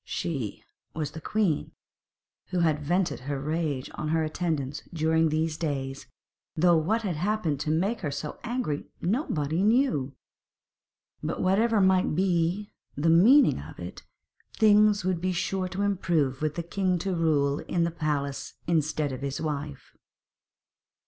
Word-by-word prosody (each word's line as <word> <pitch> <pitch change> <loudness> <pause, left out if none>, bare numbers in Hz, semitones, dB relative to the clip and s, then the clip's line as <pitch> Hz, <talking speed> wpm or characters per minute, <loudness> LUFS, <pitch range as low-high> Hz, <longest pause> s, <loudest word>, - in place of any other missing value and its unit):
'She' 135 - -4 0.3
was 150 -2 -2
the 160 - -8
queen, 200 -7 0 0.7
who 180 -1 -1
had 155 -3 +2
vented 175 +5 0
her 140 +1 -4
rage 150 -2 -2
on 155 - -4
her 160 +1 +1
attendants 155 -3 -2
during 160 0 +2
these 155 0 0
days, 135 -4 -3 0.5
though 175 +2 +4
what 205 +9 +1
had 185 -5 -1
happened 180 -5 0
to 150 - -2
make 190 +9 0
her 155 - -2
so 145 +1 -5
angry 240 - -2
nobody 170 - 0
knew. 215 - +2 1.1
But - - -3
whatever 215 +4 +3
might 190 -4 +3
be 180 +2 0 0.2
the 160 +3 +2
meaning 230 - +6
of 75 +3 -10
it, 85 +1 -8 0.5
things 210 -2 +4
would 185 -3 0
be 185 0 0
sure 185 +2 -1
to 190 +2 -3
improve 165 -9 0
with 155 -1 -1
the 170 - -3
king 185 +1 0
to 190 +2 -2
rule 150 -4 +2
in 170 -2 -1
the 170 - 0
palace 145 -4 -3
instead 155 -3 0
of 130 0 -6
his 140 0 -3
wife. 145 -4 -5
165 Hz, 150 wpm, -27 LUFS, 145-185 Hz, 1.1 s, meaning